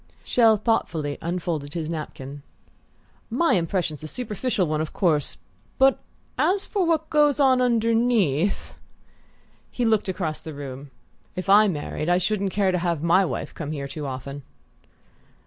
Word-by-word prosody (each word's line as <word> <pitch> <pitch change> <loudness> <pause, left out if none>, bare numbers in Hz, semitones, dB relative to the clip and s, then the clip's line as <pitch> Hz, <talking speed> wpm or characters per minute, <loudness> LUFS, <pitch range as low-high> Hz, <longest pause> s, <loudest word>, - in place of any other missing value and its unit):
Chelles 225 -4 +4
thoughtfully 160 -11 0
unfolded 165 -4 -3
his 160 -2 -2
napkin. 145 -3 -6 0.9
"My 295 +9 +2
impression's 170 -3 -1
a 155 - -6
superficial 215 0 -1
one, 155 -1 -1
of 155 - -4
course 155 -7 +1 0.4
for 270 0 +5 0.4
as 390 +2 +2
to 410 - -4
what 320 -2 0
goes 295 -1 +3
on 260 -2 +4
underneath 225 - +1 0.5
!" - - -35 0.3
He 245 - -2
looked 220 -3 +2
across 175 -5 -3
the 160 -2 -8
room. 140 0 -7 0.5
"If 185 0 -4
I 210 +2 +7
married 155 -2 -3
I 175 - +4
shouldn't 195 +2 0
care 195 0 +1
to 180 - 0
have 170 -3 -1
my 170 +3 +4
wife 185 - -4
come 155 -2 -5
here 140 -2 -4
too 145 +1 -6
often." 135 +2 -6
180 Hz, 150 wpm, -24 LUFS, 155-225 Hz, 0.9 s, I